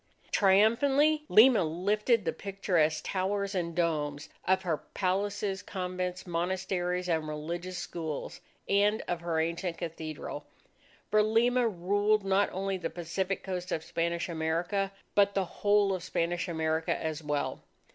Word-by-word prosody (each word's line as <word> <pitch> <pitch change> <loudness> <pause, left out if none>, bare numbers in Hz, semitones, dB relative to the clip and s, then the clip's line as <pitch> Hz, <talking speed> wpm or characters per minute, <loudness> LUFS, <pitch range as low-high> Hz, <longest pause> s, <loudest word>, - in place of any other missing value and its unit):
Triumphantly, 270 +10 +4
Lima 225 -2 +7
lifted 205 +7 +1
the - - 0
picturesque 180 -6 0
towers 200 +1 -1
and 170 -3 -2
domes 150 -4 -1 0.2
of 190 0 +2
her 165 -4 0
palaces, 195 +2 -2
convents, 180 -1 -4
monasteries, 180 +1 -1
and 160 -3 0
religious 170 +4 -4
schools, 160 -5 -5 0.3
and 205 +2 +2
of 175 -1 -2
her 170 -2 -1
ancient 170 +1 -2
cathedral, 160 -3 -6 0.6
for 215 0 +5
Lima 235 +3 +3
ruled 205 +2 +1
not 195 +1 +3
only 195 +1 -2
the 165 -2 -3
Pacific 180 +3 -3
coast 180 -1 -4
of 160 - -1
Spanish 170 +1 -1
America, 170 +4 -1 0.2
but 200 -1 +3
the 195 -1 +1
whole 205 +1 +2
of 185 - -3
Spanish 175 +1 -1
America 160 -1 0
as 160 -1 -3
well. 150 -1 -2
185 Hz, 135 wpm, -30 LUFS, 165-200 Hz, 0.6 s, Lima